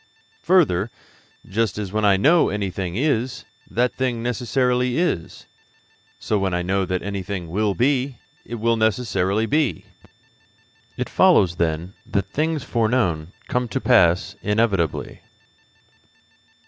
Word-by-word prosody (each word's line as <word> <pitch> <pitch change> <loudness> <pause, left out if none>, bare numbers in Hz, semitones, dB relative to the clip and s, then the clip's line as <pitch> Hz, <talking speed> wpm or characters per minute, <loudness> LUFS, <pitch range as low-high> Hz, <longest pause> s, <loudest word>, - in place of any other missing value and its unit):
Further, 120 - +3 0.6
just 105 -1 -1
as 100 -3 -4
when 110 +1 -1
I 100 -1 +5
know 155 - +4
that - - -3
anything 95 -3 -3
is, 125 -1 -1 0.2
that 125 +1 +1
thing 125 -3 -2
necessarily 125 +1 0
is, 165 - -2 0.7
so 105 - -1
when 95 -2 0
I 90 - -1
know 95 +1 0
that 90 0 -2
anything 95 -3 -4
will 100 +3 0
be, 130 0 +1 0.3
it 120 - -7
will 115 0 +1
necessarily 110 -2 +1
be. 150 +3 0 1.1
It - - -2
follows, 85 -2 +4
then, 85 +2 -1
that 100 - -1
things 155 -1 -1
foreknown 110 -9 0 0.2
come 125 0 -1
to 135 - -2
pass 100 -6 +3
inevitably. 105 -6 0
110 Hz, 125 wpm, -22 LUFS, 95-125 Hz, 1.1 s, I